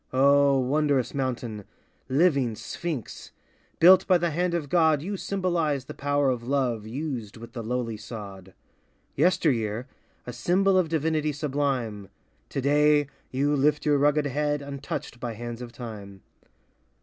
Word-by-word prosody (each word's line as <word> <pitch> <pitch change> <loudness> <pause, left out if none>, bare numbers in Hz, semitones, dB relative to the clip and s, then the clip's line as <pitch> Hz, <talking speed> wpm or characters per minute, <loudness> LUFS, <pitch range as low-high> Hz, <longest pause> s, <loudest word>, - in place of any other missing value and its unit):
O 140 +1 +4
Wondrous 135 -1 +1
mountain 120 -5 -3 0.3
— - - -40
living 135 -10 +2
Sphinx! 155 - -6 0.5
Built 185 +2 +7
by 185 - +5
the 170 -1 -1
hand 175 +2 0
of 160 -4 -2
God, 160 -2 +3
You 200 +4 -3
symbolize 175 -9 -1
the - - -8
power 145 -1 +1
of 125 -2 -3
Love 120 -4 -1
Used 125 -4 -5
with 115 +1 -11
the 120 - -5
lowly 115 -1 -3
sod. 100 -4 -9 0.6
Yesteryear, 125 - +1 0.4
a 125 - -6
symbol 185 +10 +2
of 185 -4 +2
divinity 155 -1 0
sublime, 135 - -2 0.4
Today, 145 +1 +3 0.2
you 145 +3 +1
lift 150 +2 +2
your 145 -2 +3
rugged 145 +1 +3
head 145 +1 -1
Untouched 140 -3 -6
by 120 -2 -4
hands 120 +1 -6
of 120 -1 -7
time. 105 -5 -9
140 Hz, 140 wpm, -26 LUFS, 120-150 Hz, 0.6 s, Built